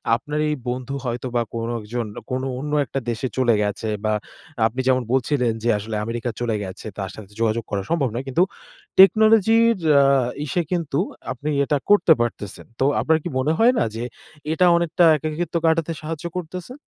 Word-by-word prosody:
আপনার 150 +5 -4
এই 150 - 0
বন্ধু 130 +2 -4
হয়তো 125 +1 -3
বা 120 - +3
কোনো 115 0 -2
একজন 115 +3 -4 0.3
কোনো 130 +1 -1
অন্য 145 +2 -5
একটা 135 - -3
দেশে 115 +3 -2
চলে 125 -3 +3
গেছে 105 +2 -3 0.2
বা 110 - +2 0.5
আপনি 120 +4 -7
যেমন 130 -1 +3
বলছিলেন 130 -2 +1
যে 120 - +1
আসলে 110 +2 -5
আমেরিকা 115 +1 -3
চলে 115 -2 0
গেছে 95 0 -8
তার 95 -2 -4
সাথে 105 -2 -12
যোগাযোগ 115 0 +1
করা 100 -1 -1
সম্ভব 155 -6 +1
নয়। 125 +3 -4
কিন্তু 155 +7 +3 0.6
টেকনোলজির 220 +3 +6 0.2
আ - - +5 0.4
ইসে 175 +5 0
কিন্তু 165 -5 -1 0.3
আপনি 140 +4 -4
এটা 145 +1 +1
করতে 205 -5 +6
পারতেসেন। 110 -4 -4
তো 135 - +2
আপনার 160 0 +3
কি - - -3
মনে 150 +4 +1
হয় 235 +3 +5
না - - +3
যে 115 - -4 0.5
এটা 170 +3 +3
অনেকটা 170 0 +1
একাকিত্ব 155 +4 -4
কাটাতে 165 0 +2
সাহায্য 155 +1 -6
করতেসে? 180 +7 -6
135 Hz, 180 wpm, -22 LUFS, 115-165 Hz, 0.6 s, টেকনোলজির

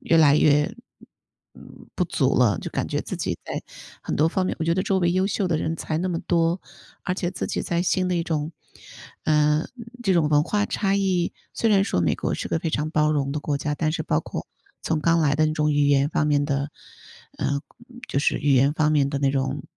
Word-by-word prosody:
越 165 - +2
来 150 -3 +6
越 150 +5 +3 1.2
不 180 - +1
足 140 -6 +1
了， 115 -8 +4
就 - - -6
感 - - -2
觉 - - -1
自 - - -6
己 - - -2
在 - - -5 0.4
很 - - -3
多 155 - +3
方 185 +2 -1
面 - - -2
我 160 - -1
觉 165 - +2
得 185 - 0
周 195 0 +1
围 175 -1 +2
优 185 +1 +2
秀 200 0 -1
的 165 - +1
人 160 +1 -2
才 155 -1 -3
那 185 +2 -1
么 170 -2 -1
多， 170 +1 +1 0.4
而 180 - -1
且 175 -2 -2
自 - - -4
己 - - -2
在 170 0 -1
新 185 +1 +1
的 180 - 0
一 170 - 0
种 160 -1 -2 0.7
呃， 150 0 +2 0.4
这 195 - +2
种 160 -4 +3
文 150 0 +4
化 205 +5 0
差 195 -2 0
异， 185 -3 0 0.2
虽 225 - +1
然 195 -2 +5
说 145 - 0
美 85 - +2
国 - - -2
是 - - -4
个 - - 0
非 165 0 -3
常 155 0 -1
包 150 -1 +2
容 140 -2 -1
的 150 - -3
国 145 -1 -1
家， 150 +1 -2
但 155 +1 0
是 160 - -2
包 80 - 0
括 - - -6 0.4
从 160 -1 -1
刚 165 +2 +3
来 145 -2 +2
的 155 +1 +3
那 155 - 0
种 150 -1 +1
语 145 0 +3
言 140 0 +3
方 155 -1 0
面 145 -1 +2
的 140 0 -1 0.7
呃， 140 0 -1 0.5
就 - - 0
是 140 - +1
语 145 0 +2
言 135 +3 +4
方 155 0 +1
面 140 -2 +3
的 140 - -2
那 140 -1 +2
种 135 +1 -2
155 Hz, 255 characters per minute, -24 LUFS, 145-175 Hz, 1.2 s, 来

